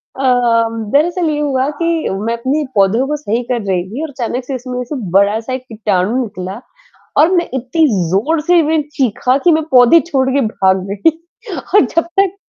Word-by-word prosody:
अ, 270 - -5 0.7
दरअसल 335 +3 +2
ये 295 -1 -1
हुआ 275 -2 0
कि 335 -1 0
मैं 210 +4 -2
अपने 275 +6 -1
पौधों 205 +6 +3
को 300 - -1
सही 240 -4 -2
कर 240 -1 -2
रही 190 -3 -1
थी 260 +7 -5
और 320 - -4
अचानक 250 -1 -4
से 265 0 -4
इसमें 250 0 -5
ऐसे 250 +5 -5 0.2
बड़ा-सा 210 +6 +1
एक 255 - -4
किटाणु 215 0 -1
निकला 190 -2 -7 0.6
और 315 +4 +5
मैं 350 -2 +2
इतनी 265 +6 +1 0.2
ज़ोर 285 - +1
से 345 +2 +3
मैं 310 +1 +1
चीखा 255 0 +1
कि 350 - +5
मैं 315 0 +2
पौधे 250 +6 +6
छोड़ 265 -5 0
के 275 +1 +1
भाग 190 -3 +1
गई। 200 +8 +2 0.6
और 410 - +7
जब 335 - 0 0.2
तक 390 -1 +2
260 Hz, 185 wpm, -15 LUFS, 220-310 Hz, 0.7 s, और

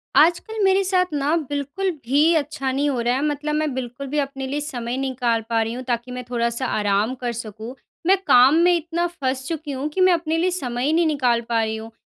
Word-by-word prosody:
आजकल 350 +8 +3
मेरे 385 0 +4
साथ 370 -1 +2
ना 290 +2 +1
बिल्कुल 290 +7 -2 0.2
भी 270 +4 +2 0.2
अच्छा 290 -3 -1
नहीं 280 +2 0
हो 260 -3 -1
रहा 240 +1 +1
है, 265 - -1
मतलब 300 0 -2
मैं 305 -2 0
बिल्कुल 255 +2 -5
भी 295 +3 -3
अपने 270 -1 -3
लिए 285 +2 -2
समय 250 -4 -4
निकाल 250 -4 0
पा 230 -1 +2
रही 225 +1 -2
हूँ, 250 +2 -6
ताकि 240 0 -3
मैं 250 0 -5
थोड़ा-सा 235 +1 -1
आराम 210 +2 0
कर 240 - 0
सकूँ। 225 +1 -7 0.3
मैं 385 +1 +6
काम 255 +4 +7
में 355 0 +5
इतना 340 +1 -1
फँस 265 -6 -3
चुकी 310 -2 -4
हूँ, 275 +2 -3
कि 340 +5 -2
मैं 370 -1 +6
अपने 325 -1 -1
लिए 360 +3 +1
समय 250 -7 -2
ही 300 - +2
नहीं 335 +1 +3
निकाल 250 -6 +1
पा 230 -1 +2
रही 220 0 -2
हूँ। 220 +1 -8
270 Hz, 230 wpm, -22 LUFS, 245-310 Hz, 0.3 s, काम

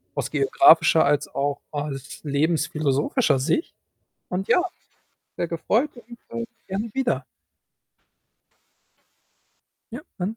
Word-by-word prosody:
aus - - -3
geografischer 165 - +5
als 145 0 +1
auch 140 +1 -2
als 145 -2 -6
lebensphilosophischer 145 -2 +1
Sicht 165 - 0 0.6
und 185 +2 -3
ja, 360 - +4 0.7
sehr 170 - -2
gefreut 220 - 0
und, 240 0 -13 0.2
äh, 115 - -2 0.2
gerne 200 +4 -3
wieder. 265 0 -1 2.7
Ja, - - -5 0.2
dann, 195 +5 -3
165 Hz, 100 wpm, -24 LUFS, 145-220 Hz, 2.7 s, geografischer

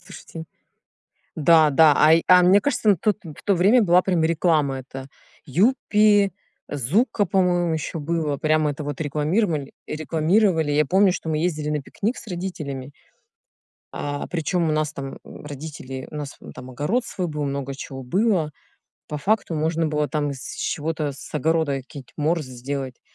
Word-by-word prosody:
слушайте. 175 -3 -10 0.9
Да-да, 155 -1 +5
ай 160 +2 +5
а 180 0 +8
мне 185 +3 +6
кажется, 225 -2 0
на 200 - +4
тот 210 +5 0
в 155 -4 -11
то 200 - +3
время 200 +8 +4
была 180 -2 +4
прям 180 -3 +1
реклама 155 -4 +1
это 135 0 -9 0.4
"Юппи", 205 - +3 0.4
"Зуко", 190 - +1
по-моему, 175 -2 +1
ещё 160 +1 -3
было. 155 -1 -1
Прямо 155 +1 +1
это 145 +1 -6
вот 145 0 -5
рекламировали 155 +1 -1
рекламировали. 160 +1 +1
Я 150 +1 +3
помню, 190 +4 +4
что 160 - -5
мы 155 - 0
ездили 155 -3 -1
на 150 -1 -1
пикник 215 - -3
с - - -11
родителями 165 -8 -5 1.0
а, 145 0 -4
причём 170 0 -1
у - - +1
нас 155 -1 0
там, 135 -1 -7
м, - - -12
родители 140 -3 -7
у - - -8
нас 145 -2 -6 0.2
там 125 0 -10
огород 165 - -1
свой 185 -5 -4
был, 150 -1 -3
много 140 -1 -3
чего 135 -1 -8
было. 180 - +1 0.6
По 150 - -4
факту 200 +3 0
можно 160 +1 0
было 150 -1 0
там 145 -2 -1
из 130 -2 -7
чего-то 155 -1 -2
с 135 - -12
огорода 160 0 +1
какие-нибудь 135 0 -11
морсы 155 -2 -1
сделать, 130 0 -5
155 Hz, 160 wpm, -23 LUFS, 145-180 Hz, 1.0 s, а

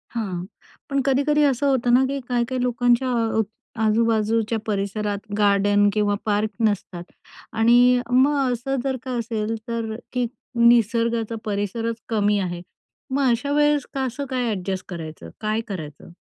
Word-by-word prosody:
हां, 185 -6 -3 0.4
पण 275 -1 +1
कधी-कधी 290 +2 +2
असं 280 0 +2
होतं 245 -3 +2
ना, 260 +2 +6
की 275 +1 -2
काही-काही 245 +1 0
लोकांच्या 245 0 +2 0.3
अ, - - +5 0.4
आजूबाजूच्या 225 0 +1
परिसरात 205 0 -2 0.2
गार्डन 205 0 +3
किंवा 205 -1 +1
पार्क 210 0 +1 0.2
नसतात 185 -4 -3 0.5
आणि 245 +2 +5
मग 270 0 +3
असं 245 +3 -2
जर 265 -1 -1
का 260 - -5
असेल, 225 -1 -2
तर 230 -1 -3 0.2
की 250 -1 +1 0.3
निसर्गाचा 235 -1 +3
परिसरच 215 +3 -2
कमी 210 -2 +2
आहे. 175 -2 -3 0.5
मग 270 -1 +2
अशा 250 +5 -1
वेळेस 295 -1 +3
कसं 265 +1 -2
काय 250 -3 -1
ॲडजस्ट 185 0 -4
करायचं? 155 - -7
काय 215 +1 0
करायचं? 155 -6 -7
230 Hz, 135 wpm, -23 LUFS, 205-255 Hz, 0.5 s, ना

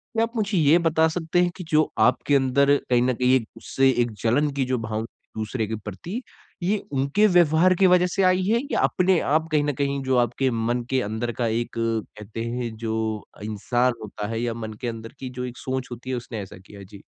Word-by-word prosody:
क्या 225 - +3
आप 230 +1 -3
मुझे 205 -3 0
ये 155 +1 +5
बता 160 -1 +3
सकते 170 +1 -1
हैं 175 - +1
कि 180 - -7
जो 155 0 +5 0.2
आपके 125 +5 +3
अंदर 140 +2 +4
कहीं 120 -1 +4
न 130 0 +2
कहीं 125 +2 +2
एक 115 -4 0
उससे 135 0 +1
एक 120 -1 0
जलन 145 +6 +2
की 135 -2 -1
जो 130 0 0
भावना 110 0 -3 0.3
दूसरे 110 0 -2
के 110 - -3
प्रति 110 - -6 0.4
ये 205 +4 +2
उनके 140 +10 +2
व्यवहार 175 0 +4
की 190 - +6
वज़ह 180 0 +4
से 195 +2 0
आई 185 0 +3
है 225 +5 +2
या - - +1
अपने 185 -1 +3
आप 155 +3 +1
कहीं 150 -1 +3
न 145 -1 0
कहीं 140 0 -1
जो 130 -1 +1
आपके 120 +2 +1
मन 120 +1 -1
के 130 -1 +1
अंदर 110 +3 -3
का 115 - +2
एक 115 +2 -1
कहते 115 -1 -3
हैं 120 -1 -3
जो 110 -1 -3 0.5
इंसान 120 +4 0
होता 105 0 -5
है 115 0 -3
या 120 -1 -1
मन 110 -1 -6
के 120 - -2
अंदर 115 -1 -6
की 130 - -5
जो 125 - -2
एक 125 0 -7
सोच 130 -1 -3
होती 125 +2 -8
है 130 - 0
उसने 115 -3 -5
ऐसा 95 - -10
किया? 100 +2 -13
जी। 100 +1 -13
130 Hz, 225 wpm, -24 LUFS, 115-160 Hz, 0.5 s, की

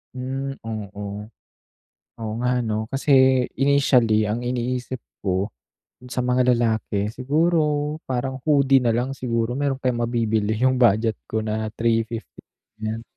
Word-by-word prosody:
Mm, 135 +2 -4
oo. 105 -3 -6 1.2
Oo 110 -1 -4
nga 125 0 +2
ano, 110 -2 -1
kasi, 135 +2 0 0.4
initially 125 -6 +3
ang 115 +4 -2
iniisip 125 +1 -2 0.2
ko, 95 0 0 0.6
sa 125 0 -2
mga 125 0 +3
lalaki, 110 -3 0
siguro 150 +2 +1
parang 130 +1 -2
hoodie 140 -3 +4
nalang 120 +2 +1
siguro 115 -3 -1
meron 140 0 -1
kayong 125 -3 -1
mabibili 110 -3 0
yung 130 0 +4
budget 110 -1 +4 0.2
ko 110 0 -1
na 110 0 -2
₱350 115 0 -1 0.4
yan. 110 +1 -3
120 Hz, 125 wpm, -23 LUFS, 110-135 Hz, 1.2 s, hoodie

